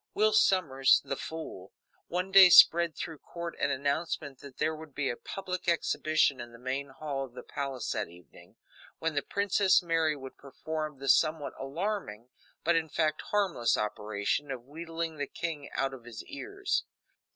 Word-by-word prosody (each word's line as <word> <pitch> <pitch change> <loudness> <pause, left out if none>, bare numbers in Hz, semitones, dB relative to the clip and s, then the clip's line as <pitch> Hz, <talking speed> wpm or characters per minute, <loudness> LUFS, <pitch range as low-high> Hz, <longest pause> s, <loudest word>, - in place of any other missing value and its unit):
Will 215 +1 +3
Sommers, 150 -11 +4
the 135 - -2
fool, 145 - -7 0.3
one 180 +2 -2
day 190 -1 +10
spread 170 -1 +7
through 160 -3 -6
court 170 -1 -7
an 140 - +1
announcement 140 0 -2
that 140 -2 -12
there 155 +1 0
would 155 -2 -12
be 145 -2 0
a - - -5
public 185 +6 -6
exhibition 155 -4 +2
in 120 0 -9
the 115 - -13
main 130 +3 -3
hall 135 0 -4
of 125 -2 -10
the - - -8
palace 135 -4 -4
that - - -2
evening, 85 -3 -17 0.4
when 165 0 -1
the 145 - +1
Princess 200 0 +2
Mary 165 -2 +1
would 135 -2 -10
perform 155 +2 -5
the 135 +1 -7
somewhat 155 -1 +3
alarming, 135 - -4 0.3
but, 170 +1 +3
in 160 -1 0
fact, 155 0 0
harmless, 190 - +1
operation 105 +6 -2
of 125 -3 -5
wheedling 165 +2 -5
the 145 -1 -3
king 155 -4 -5
out 135 0 -1
of 125 -3 -11
his 120 -2 -8
ears. 400 +7 -3
155 Hz, 170 wpm, -30 LUFS, 135-170 Hz, 0.4 s, day